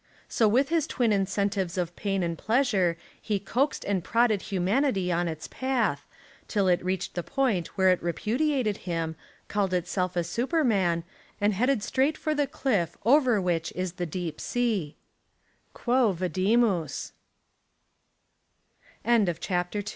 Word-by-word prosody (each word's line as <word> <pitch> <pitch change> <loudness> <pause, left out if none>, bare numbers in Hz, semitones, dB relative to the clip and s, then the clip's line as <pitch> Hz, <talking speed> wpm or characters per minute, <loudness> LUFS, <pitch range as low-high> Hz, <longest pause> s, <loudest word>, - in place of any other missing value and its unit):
So 225 - +2
with 255 +7 +3
his 325 -2 +1
twin 240 -8 +1
incentives 195 -2 0
of 175 -1 -2
pain 195 -2 -1
and 170 -1 -1
plea 235 - +2
sure 185 -9 +1 0.2
he 210 -2 -1
coaxed 250 +9 -1
and 195 -4 0
prodded 230 -2 +2
humanity 195 0 0
on 175 0 +1
its 160 -1 -5
path, 260 -3 -1 0.4
till 200 -3 +1
it 175 -1 +2
reached 185 +1 -2
the 175 - -2
point 225 -6 0
where 190 -1 +5
it 185 - +2
repudi 225 - 0
ated 215 -7 0
him, 165 -1 -2 0.3
called 195 -3 0
itself 180 +1 -1
a 175 - +1
Superman, 200 - +1 0.4
and 205 +1 +2
headed 245 +2 +1
straight 275 +7 +1
for 310 - -1
the 290 -2 +1
cliff 215 - -1
over 255 -3 +5
which 175 -3 -1
is 185 -1 -2
the 175 - -1
deep 165 -1 -4
200 Hz, 130 wpm, -27 LUFS, 180-245 Hz, 0.4 s, where